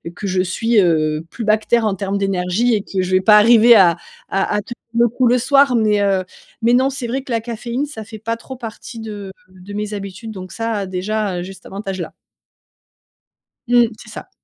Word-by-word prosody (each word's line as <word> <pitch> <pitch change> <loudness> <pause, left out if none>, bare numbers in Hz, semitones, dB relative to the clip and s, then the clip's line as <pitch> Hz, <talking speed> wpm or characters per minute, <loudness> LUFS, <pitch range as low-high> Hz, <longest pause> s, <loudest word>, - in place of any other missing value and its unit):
que 200 - -5
je 185 -1 +1
suis, 225 +5 +1
heu, 155 -3 +1
plus 230 - -6
bas 215 0 +4
que 215 - -17
terre 235 -1 +3
en 205 -2 0
terme 195 +1 -2
d'énergie 195 +4 0
et 210 - -1
que 190 -2 -2
je 185 0 -3
vais 185 0 +3
pas 210 +2 +6
arriver 230 +2 +7
à 180 -5 +6 0.3
à 195 +1 0
à 210 - 0
tenir 210 - -8 0.3
le 240 - +5
coup 245 +2 +1
le 245 +1 +4
soir, 275 +1 +4
mais, 215 -2 +2
heu, 195 -2 +1 0.4
mais 235 +1 +3
non, 260 +2 +4
c'est 265 -3 -5
vrai 260 +4 -2
que 265 - -10
la 230 - +1
caféine, 235 +3 -4
ça 250 -7 -8
fait 220 +1 -11
pas 230 +2 -2
trop 260 +2 -10
partie 230 0 -8
de 205 -3 -7 0.2
de 185 +2 -12
mes 210 0 -4
habitudes 200 +2 -7
donc 185 -3 -9
ça, 225 -3 -2
déjà, 190 +1 -2
heu, - - -4
j'ai 190 +2 -8
cet - - -18
avantage-là. 195 -2 -6 1.5
Mmh, 240 -1 +5
c'est 215 - -13
ça. 215 - -9
215 Hz, 220 wpm, -19 LUFS, 190-235 Hz, 1.5 s, arriver